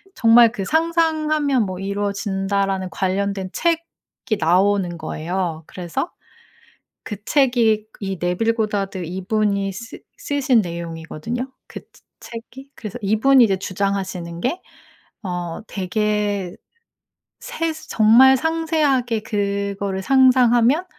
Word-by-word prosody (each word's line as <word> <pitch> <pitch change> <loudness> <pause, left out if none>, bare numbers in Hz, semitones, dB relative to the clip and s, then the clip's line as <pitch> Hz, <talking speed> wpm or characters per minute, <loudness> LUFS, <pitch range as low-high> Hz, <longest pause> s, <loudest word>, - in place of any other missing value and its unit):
정말 230 0 +6
그 205 -5 -4
"상상하면 310 - +1
뭐 185 -1 -5
이루어진다."라는 195 -1 -1
관련된 195 +2 -2
책이 335 - -3
나오는 180 +1 +2
거예요. 165 +1 -3
그래서 175 - -4 0.9
그 210 - -5
책이 235 -7 +2
이 195 -2 -4
네빌 180 +6 +1
고다드 205 -4 -2
이분이 200 +2 -1
쓰 225 +4 -9 0.2
쓰신 270 -4 +2
내용이거든요. 170 - -5 0.2
그 - - -8 0.4
채 235 - -9
책이. 270 +2 -13
그래서 215 +2 -7
이분이 235 +6 +5
이제 195 -4 +2
주장하시는 185 -3 -3
게 335 +9 -1 0.6
어 175 -3 -4
되게 205 -1 -1 0.8
세스 320 -1 -4
"정말 240 +5 +6
상세하게 300 -7 0
그거를 200 -2 -2
상상하면 255 - +4
205 Hz, 245 characters per minute, -21 LUFS, 190-255 Hz, 0.9 s, 정말